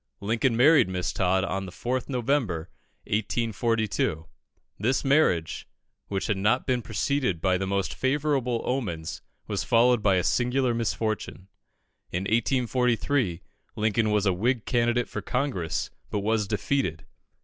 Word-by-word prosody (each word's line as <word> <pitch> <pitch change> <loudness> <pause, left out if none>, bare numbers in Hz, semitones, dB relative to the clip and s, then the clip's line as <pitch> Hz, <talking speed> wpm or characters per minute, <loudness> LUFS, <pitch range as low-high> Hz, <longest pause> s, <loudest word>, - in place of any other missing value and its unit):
Lincoln 115 +3 0
married 145 -4 +6
Miss 90 -1 -2
Todd 95 0 +1
on 95 0 -2
the - - -8
4th 125 +9 -3
November, 120 - -1 0.3
1842. 110 -5 -1 0.5
This 125 +7 0
marriage, 135 - +2 0.4
which 95 -1 -2
had 105 - 0
not 110 +6 +2
been 125 -2 +1
preceded 115 - -1
by 95 +1 +2
the 95 - -2
most 100 0 -1
favourable 130 -3 0
omens, 95 -12 -3 0.2
was - - -2
followed 120 0 +4
by 100 -2 +3
a 90 - +1
singular 125 +3 +1
misfortune. 110 -4 -3 0.6
In 90 +2 -2
1843, 120 -2 +1 0.3
Lincoln 110 0 +1
was 105 -1 +2
a 95 - +3
Whig 115 +5 0
candidate 120 0 +1
for - - -5
Congress, 125 - -2 0.2
but 105 - -2
was 105 0 0
defeated. 105 - -1
115 Hz, 135 wpm, -26 LUFS, 95-125 Hz, 0.6 s, married